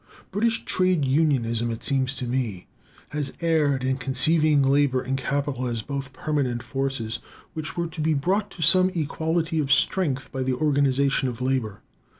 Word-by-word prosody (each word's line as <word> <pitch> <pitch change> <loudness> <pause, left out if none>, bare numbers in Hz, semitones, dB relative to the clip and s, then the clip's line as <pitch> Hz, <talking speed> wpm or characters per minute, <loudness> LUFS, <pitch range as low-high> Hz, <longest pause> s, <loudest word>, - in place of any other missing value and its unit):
British 225 +4 0
trade 185 -5 +2
unionism, 130 -5 +1
it 115 0 -5
seems 135 -2 0
to 130 - -4
me, 120 -7 -2 0.4
has 145 -2 -4
erred 150 -5 +1
in 130 0 0
conceiving 150 +2 +3
labor 135 -1 +3
and 130 +1 -2
capital 135 -1 -2
as 115 -2 -2
both 140 0 -5
permanent 130 -3 -2
forces, 125 -3 -3 0.3
which 155 0 -5
were 170 - 0
to 165 -1 -6
be 155 0 +2
brought 195 +8 0
to 170 - -5
some 185 +4 +5
equality 160 +1 -1
of 140 -3 -1
strength 140 -8 +1
by 135 - -3
the 130 0 0
organization 140 -1 +2
of 120 -1 -7
labor. 125 -5 -1
140 Hz, 160 wpm, -25 LUFS, 130-155 Hz, 0.4 s, some